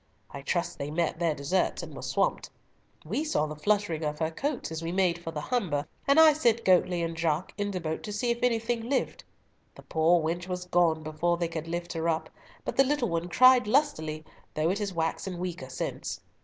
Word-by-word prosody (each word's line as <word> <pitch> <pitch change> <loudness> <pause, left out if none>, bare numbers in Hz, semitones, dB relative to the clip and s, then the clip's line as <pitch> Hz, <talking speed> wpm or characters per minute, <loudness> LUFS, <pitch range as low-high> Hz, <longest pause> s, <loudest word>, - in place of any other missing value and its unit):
I 140 - -7
trust 175 +4 -2
they 140 - -3
met 165 +1 -1
their 165 -3 +1
deserts 150 +7 0
and - - -8
were - - -8
swamped. - - 0 0.6
We 300 - -1
saw 300 - +1
the 155 0 -6
fluttering 170 -1 0
of 150 0 -2
her 160 0 -1
coats 275 - -3
as 160 0 -4
we 165 0 -3
made 180 -2 +1
for 165 - -4
the 160 -2 -4
Humber, 160 - -1 0.2
and 280 +3 +5
I 320 -1 +8
sent 235 -6 +1
Goatley 180 -2 +3
and 165 0 -4
Jaques 160 +1 -1
in 205 0 -2
the 190 -2 -3
boat 160 -2 -3
to 210 - -5
see 225 +4 0
if 235 - -2
anything 230 -1 0
lived. 275 - -1 0.5
The - - -13
poor 165 +2 +3
wench 170 +3 -2
was 180 -1 -4
gone 170 -3 +2
before 155 +3 0
they 170 -1 0
could 165 -1 -5
lift 175 +1 -4
her 165 0 -1
up, 160 -1 -1 0.3
but - - -4
the 270 - +7
little 270 -4 0
one 170 +1 -2
cried 255 +3 +6
lustily, 210 - +1 0.3
though 155 +3 +2
it 200 - -2
has 205 -2 -2
waxen 170 +2 -2
weaker 175 -6 -5
since. - - -4
175 Hz, 215 wpm, -28 LUFS, 160-210 Hz, 0.6 s, I